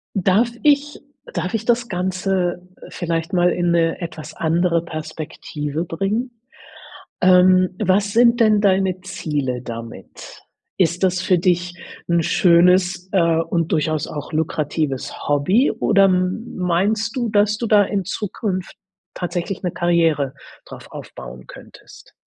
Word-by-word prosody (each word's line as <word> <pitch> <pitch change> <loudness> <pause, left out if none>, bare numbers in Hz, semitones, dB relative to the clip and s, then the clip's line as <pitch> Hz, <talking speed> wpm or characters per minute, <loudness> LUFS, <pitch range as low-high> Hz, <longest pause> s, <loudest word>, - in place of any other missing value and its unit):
Darf 195 +5 +2
ich 290 0 +2 0.3
darf 185 - -3
ich 225 -1 -1
das 240 0 +1
Ganze, 180 -1 -2 0.2
äh, - - -10
vielleicht 165 0 -3
mal 180 -1 +3
in 175 -1 0
'ne 165 -1 +1
etwas 160 -3 -7
andere 170 +1 +1
Perspektive 155 -1 -5
bringen? 200 +9 -2 0.9
Ähm, 185 0 +5
was 200 0 +1
sind 235 +1 +4
denn 215 -2 +4
deine 190 -2 +1
Ziele 145 -9 -3
damit? 115 -1 -10 0.4
Ist 175 0 +1
das 185 -1 +2
für 185 -1 +2
dich 175 0 0 0.4
'n 170 0 +3
schönes, 180 +2 +3
äh, 170 -4 +3
und 165 0 -1
durchaus 155 -1 0
auch 150 +2 -7
lukratives 155 -3 -2
Hobby 185 - +3
oder 200 -3 +3
m 185 +4 -1
meinst 200 +5 0
du, 240 -3 -1
dass 210 0 +2
du 235 - -3
da 210 -1 +5
in 200 -1 -2
Zukunft 195 -1 -4 0.4
tatsächlich 175 +1 -4
'ne 180 - -1
Karriere 165 -6 +1 0.3
drauf - - -11
aufbauen 65 0 -10
könntest? - - -15
180 Hz, 130 wpm, -20 LUFS, 165-195 Hz, 0.9 s, Ähm